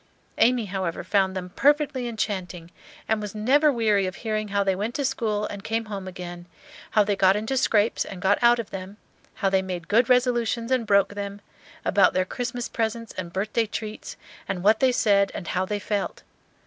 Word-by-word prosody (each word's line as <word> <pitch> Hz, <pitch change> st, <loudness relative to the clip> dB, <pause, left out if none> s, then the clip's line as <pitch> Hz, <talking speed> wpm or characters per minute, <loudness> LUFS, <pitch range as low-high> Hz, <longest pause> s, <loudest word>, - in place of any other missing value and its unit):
Amy, 245 Hz, -1 st, +4 dB
however, 185 Hz, -3 st, -3 dB
found 195 Hz, -2 st, +1 dB
them 180 Hz, -1 st, -5 dB
perfectly 290 Hz, -, +2 dB
enchanting, 185 Hz, -7 st, -4 dB, 0.4 s
and 220 Hz, -1 st, +1 dB
was 210 Hz, 0 st, -6 dB
never 280 Hz, +8 st, +4 dB
weary 215 Hz, -6 st, +2 dB
of 185 Hz, -, -5 dB
hearing 215 Hz, -2 st, -2 dB
how 200 Hz, 0 st, +1 dB
they 195 Hz, -1 st, +1 dB
went 210 Hz, +5 st, -3 dB
to 280 Hz, -, -1 dB
school 215 Hz, -5 st, -1 dB
and 200 Hz, -1 st, -7 dB
came 225 Hz, 0 st, -2 dB
home 200 Hz, -3 st, -6 dB
again, 175 Hz, -1 st, -8 dB, 0.4 s
how 210 Hz, -, +4 dB
they 205 Hz, 0 st, 0 dB
got 190 Hz, 0 st, +4 dB
into 220 Hz, +5 st, -2 dB
scrapes 225 Hz, -4 st, +2 dB
and 190 Hz, -, -8 dB
got 195 Hz, +2 st, +2 dB
out 240 Hz, 0 st, +6 dB
of 230 Hz, -3 st, -5 dB
them, 195 Hz, +1 st, -7 dB, 0.4 s
how 200 Hz, -, 0 dB
they 190 Hz, 0 st, +3 dB
made 180 Hz, -3 st, -5 dB
good 230 Hz, +4 st, +3 dB
resolutions 240 Hz, -1 st, +1 dB
and 250 Hz, -4 st, +1 dB
broke 200 Hz, 0 st, +3 dB
them, 200 Hz, 0 st, -5 dB, 0.5 s
about -, -, +4 dB
their 185 Hz, 0 st, +1 dB
Christmas 245 Hz, +2 st, -4 dB
presents 230 Hz, 0 st, -3 dB
and 180 Hz, -2 st, -5 dB
birthday 215 Hz, +4 st, -1 dB
treats, 215 Hz, 0 st, -6 dB, 0.3 s
and 185 Hz, -2 st, -3 dB
what 215 Hz, +2 st, +4 dB
they 260 Hz, -1 st, +4 dB
said 200 Hz, -4 st, +3 dB
and 175 Hz, -, -5 dB
how 185 Hz, +1 st, 0 dB
they 210 Hz, +2 st, -2 dB
felt. 205 Hz, 0 st, -3 dB
210 Hz, 195 wpm, -25 LUFS, 190-230 Hz, 0.5 s, out